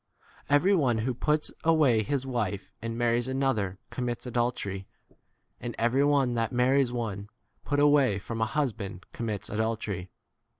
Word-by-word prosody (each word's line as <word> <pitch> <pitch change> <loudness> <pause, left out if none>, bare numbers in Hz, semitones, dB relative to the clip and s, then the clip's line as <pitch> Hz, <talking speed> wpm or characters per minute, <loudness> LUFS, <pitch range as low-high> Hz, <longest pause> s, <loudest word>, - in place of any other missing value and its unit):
Every 145 +8 +4
one 130 -9 +2
who 120 +4 -1
puts 150 +5 0
away 150 -9 +4
his 135 +4 -1
wife 110 -7 -2
and 115 0 -4
marries 120 +1 +1
another 130 -8 0
commits 120 -1 -3
adul 120 0 +1
tery. 95 -5 -5 0.7
And 120 -1 -5
every 120 +4 +2
one 140 -4 +3
that 115 -1 0
marries 130 +1 +3
one 105 -4 -4 0.4
put 145 0 0
away 145 -7 +4
from 115 +3 -5
a 110 - +2
husband 110 - -2
commits 110 -4 -3
adultery. 105 -4 -2
120 Hz, 145 wpm, -28 LUFS, 110-135 Hz, 0.7 s, Every